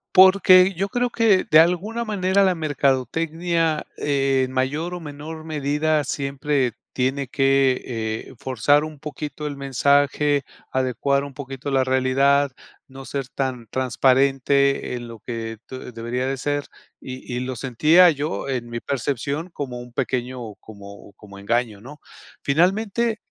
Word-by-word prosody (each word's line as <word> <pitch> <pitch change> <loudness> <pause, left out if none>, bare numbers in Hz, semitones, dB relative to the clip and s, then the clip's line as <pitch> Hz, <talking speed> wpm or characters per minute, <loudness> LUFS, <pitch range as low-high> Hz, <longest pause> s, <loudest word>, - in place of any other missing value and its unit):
Porque 185 0 +7
yo 195 +4 -2
creo 245 +3 0
que 225 -5 +3
de 155 - +4
alguna 185 +8 +2
manera 195 -2 +2
la 190 -1 +3
mercadotecnia, 160 +2 0
en 135 -2 +1
mayor 145 +7 -1
o 180 - -5
menor 155 +1 -8
medida, 150 0 0
siempre 140 -2 -1 0.2
tiene 135 +2 -1
que, 135 0 +2 0.5
eh, - - -13
forzar 130 +4 +2
un 155 -2 -8
poquito 150 +1 -6
el 145 -1 -6
mensaje, 140 +1 +2 0.3
adecuar 130 +2 0
un 140 -1 -8
poquito 135 0 -6
la 135 -1 +3
realidad, 135 +2 +2 0.4
no 135 0 -11
ser 135 -2 -4
tan 130 -4 -3
transparente 135 +2 +2
en 120 -1 -5
lo 115 -1 -9
que 115 -1 -6
te 130 -1 -9
debería 120 +2 -3
de 135 0 -2
ser 145 +2 -2 0.4
y 130 -1 -7
y - - -1
lo 130 +1 -4
sentía 155 +9 +5
yo, 145 -1 -3
en 125 -3 -3
mi 120 0 -4
percepción, 140 +5 -3
como 130 -7 -6
un 120 0 -11
pequeño, 125 -3 -3
como 100 -1 -13
como 100 -1 -14
engaño, 110 0 -1
¿no? 145 +5 -11 0.5
Finalmente 205 +9 +1
140 Hz, 140 wpm, -22 LUFS, 130-155 Hz, 0.5 s, Porque